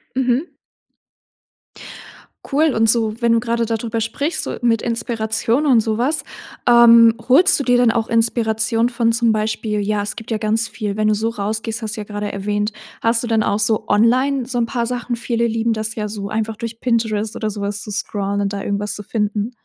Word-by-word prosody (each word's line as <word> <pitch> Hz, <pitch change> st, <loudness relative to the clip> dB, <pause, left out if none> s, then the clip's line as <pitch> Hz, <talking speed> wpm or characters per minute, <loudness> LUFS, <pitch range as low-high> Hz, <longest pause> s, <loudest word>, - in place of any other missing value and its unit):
Mhm. 260 Hz, +5 st, 0 dB, 2.0 s
Cool 300 Hz, +2 st, +2 dB
und 225 Hz, 0 st, +2 dB
so, 225 Hz, 0 st, +1 dB
wenn 235 Hz, -1 st, +3 dB
du 230 Hz, -, +3 dB
grade 235 Hz, 0 st, -1 dB
dadrüber 225 Hz, 0 st, -2 dB
sprichst, 285 Hz, +9 st, -2 dB
so -, -, -4 dB
mit 230 Hz, -2 st, +2 dB
Inspiration 230 Hz, +3 st, -1 dB
und 245 Hz, -6 st, +5 dB
sowas, 235 Hz, +8 st, 0 dB, 0.5 s
ähm, 235 Hz, -1 st, +7 dB
holst 340 Hz, +7 st, +5 dB
du 280 Hz, -, -2 dB
dir 245 Hz, -1 st, +4 dB
dann 245 Hz, -2 st, +4 dB
auch 225 Hz, -1 st, -1 dB
Inspiration 225 Hz, 0 st, +1 dB
von 235 Hz, -2 st, +1 dB
zum 230 Hz, -1 st, +2 dB
Beispiel 215 Hz, 0 st, -1 dB
ja, 210 Hz, 0 st, 0 dB
es 205 Hz, -, -4 dB
gibt 225 Hz, +1 st, -9 dB
ja 220 Hz, -, +1 dB
ganz 225 Hz, +1 st, -1 dB
viel, 210 Hz, -3 st, -4 dB
wenn 215 Hz, 0 st, +1 dB
du 210 Hz, -, +2 dB
so 225 Hz, +2 st, -1 dB
rausgehst, 220 Hz, +1 st, -3 dB
hast 220 Hz, 0 st, -4 dB
du -, -, -4 dB
ja -, -, -7 dB
grade 205 Hz, 0 st, -4 dB
erwähnt, 205 Hz, +2 st, -2 dB, 0.3 s
hast 230 Hz, +1 st, +1 dB
du -, -, -3 dB
dann 225 Hz, -2 st, +2 dB
auch 205 Hz, -, 0 dB
so 215 Hz, 0 st, 0 dB
online 255 Hz, +5 st, +2 dB
so 245 Hz, 0 st, -4 dB
'n 235 Hz, -, +2 dB
paar 235 Hz, 0 st, -2 dB
Sachen? 245 Hz, 0 st, -3 dB
Viele 235 Hz, 0 st, -1 dB
lieben 225 Hz, 0 st, 0 dB
das 220 Hz, 0 st, -3 dB
ja 210 Hz, -1 st, -3 dB
so, 205 Hz, -1 st, -6 dB
einfach 220 Hz, +1 st, -2 dB
durch 230 Hz, 0 st, -7 dB
Pinterest 225 Hz, -3 st, -1 dB
oder 215 Hz, -2 st, -2 dB
so 205 Hz, 0 st, -6 dB
was 200 Hz, +1 st, -3 dB
zu 210 Hz, -, -7 dB
scrollen 200 Hz, -1 st, -2 dB
und 200 Hz, 0 st, -1 dB
da 200 Hz, -, -4 dB
irgendwas 200 Hz, 0 st, -2 dB
zu 210 Hz, -, -8 dB
finden. 210 Hz, +1 st, -2 dB
225 Hz, 205 wpm, -19 LUFS, 215-235 Hz, 2.0 s, ähm